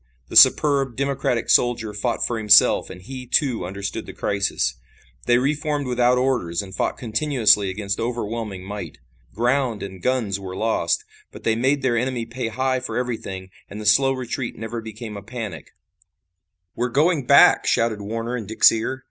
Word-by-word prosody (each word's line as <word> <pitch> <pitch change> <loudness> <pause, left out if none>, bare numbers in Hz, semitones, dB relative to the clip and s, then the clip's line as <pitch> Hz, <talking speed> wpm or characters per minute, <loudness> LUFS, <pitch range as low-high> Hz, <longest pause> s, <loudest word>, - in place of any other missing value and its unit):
The - - -8
superb, 140 -4 +5
democratic 135 -3 -1
soldier 120 -3 +2
fought 115 +3 -1
for 120 -2 -2
himself 105 -1 +5
and 90 - -11
he, 130 +3 -8
too, 125 - 0
understood 100 +1 -5
the - - -8
crisis. 100 0 -1 0.5
They 120 - +5
re 135 +4 +1
formed 150 -1 -3
without 125 0 +2
orders 125 -10 0
and 95 -1 -11
fought - - -2
continuously 110 -4 +2
against 100 +1 -4
overwhelming 115 -4 -4
might. 100 +2 -7 0.4
Ground 120 -1 0
and 95 -2 -8
guns 110 -4 -1
were 95 -1 -7
lost, 115 - 0 0.3
but - - -12
they 110 - +1
made 135 +4 0
their 125 -2 +1
enemy 125 -1 -2
pay 115 +1 -5
high 130 +3 -1
for 130 - -5
everything, 100 -7 -5 0.2
and 105 - -8
the 105 - -7
slow 135 +6 +4
retreat 130 -1 -4
never 115 +1 -5
became 110 0 -8
a 100 - -7
panic. 110 - -8 1.0
"We're 125 +1 -1
going 145 +1 +1
back," - - +6
shouted 115 -3 +1
Warner 115 +4 -4
in 115 -5 -6
Dick's 110 - +5
ear. 115 +4 -3
115 Hz, 170 wpm, -22 LUFS, 105-130 Hz, 1.0 s, back